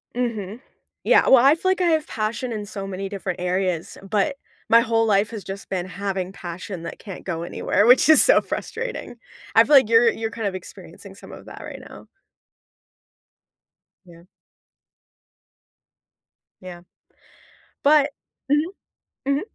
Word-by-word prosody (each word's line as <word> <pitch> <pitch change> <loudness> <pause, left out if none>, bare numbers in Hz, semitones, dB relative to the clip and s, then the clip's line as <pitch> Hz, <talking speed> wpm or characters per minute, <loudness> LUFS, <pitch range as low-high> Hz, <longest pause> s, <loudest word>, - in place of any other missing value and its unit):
Mhm. 225 -3 -3 0.4
Yeah. - - +4
Well, 265 -2 +6
I 285 +3 +6
feel 375 +2 0
like 375 - -1
I - - +2
have 315 -2 +1
passion 225 +3 -3
in 210 -2 -4
so 200 -1 -7
many 195 0 -5
different 190 -2 -5
areas, 180 -2 -2
but, 210 +8 -1 0.3
my 230 - +7
whole 225 -1 +1
life 210 +1 +2
has 215 -4 -7
just 195 +1 -8
been 185 -2 -3
having 190 0 -4
passion 180 -1 -8
that - - -7
can't 195 -4 -10
go 170 -2 -4
anywhere, 200 +3 0
which 250 +4 +6
is 315 -1 +8
so - - +6
frustrating. 475 - -6 0.4
I 225 - +6
feel 295 - +4
like 265 -6 +6
you're 230 0 +5
you're 225 -1 -4
kind 225 -2 -3
of 190 - -4
experiencing 185 - -11
some - - -13
of - - -11
that - - -10
right - - -9
now. - - -13 2.0
Yeah. 170 -1 -16 2.4
Yeah. 175 -1 -10 1.0
But 295 0 +4 0.4
Mhm. 300 +5 +1 0.6
Mhm. 280 +1 +1
215 Hz, 150 wpm, -22 LUFS, 190-255 Hz, 2.4 s, is